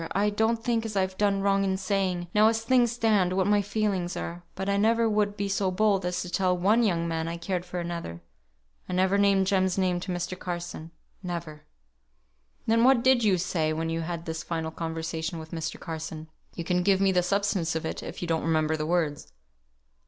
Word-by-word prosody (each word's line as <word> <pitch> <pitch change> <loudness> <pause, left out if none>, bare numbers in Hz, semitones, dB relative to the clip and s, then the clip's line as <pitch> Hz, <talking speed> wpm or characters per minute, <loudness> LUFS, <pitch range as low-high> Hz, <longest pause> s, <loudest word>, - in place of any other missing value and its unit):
I 205 +2 +2
don't 225 +2 0
think 230 -2 +1
as 220 -2 -5
I've 190 -1 0
done 200 -1 +2
wrong 195 0 +3
in 190 -1 0
saying, 185 -2 -1
now 215 +1 +6
as 225 0 +1
things 245 -1 +3
stand, 215 -6 +2
what 190 0 +1
my 205 +1 +3
feelings 200 -3 -1
are; 170 +1 -5
but 190 +1 -4
I 200 - +2
never 225 +3 +3
would 210 -1 0
be 200 -1 -1
so 195 -1 0
bold 195 -1 +1
as 180 - -2
to 180 - -7
tell 180 0 +1
one 205 +6 +3
young 170 -7 +1
man 165 -1 -2
I 170 +1 -4
cared 175 +1 -3
for 180 0 -5
another. 170 - -5 0.7
I - - -3
never 190 +2 +2
named 200 -1 +4
Jem's 190 -1 +1
name 180 -2 +1
to 185 +1 -5
Mr. 180 +1 -3
Carson. 175 -2 -5 0.3
Never." 170 -4 -6 1.0
"Then 230 +1 +3
what 255 -2 +5
did 260 -2 +4
you 200 -4 +3
say 165 -3 0
when 165 +1 -2
you 165 0 -1
had 170 0 -5
this 160 -1 -4
final 160 -1 -3
conversation 160 0 -4
with 160 0 -9
Mr. 160 -2 -4
Carson? 160 -1 -6 0.3
You 170 - -4
can 180 +1 +1
give 190 +1 +3
me 195 -1 +3
the 180 -1 +3
substance 190 -3 0
of 160 - -2
it, - - -4
if - - -7
you - - -3
don't 165 -1 0
remember 160 0 +1
the 155 0 -3
words." 160 -4 -1
185 Hz, 210 wpm, -27 LUFS, 170-205 Hz, 1.0 s, now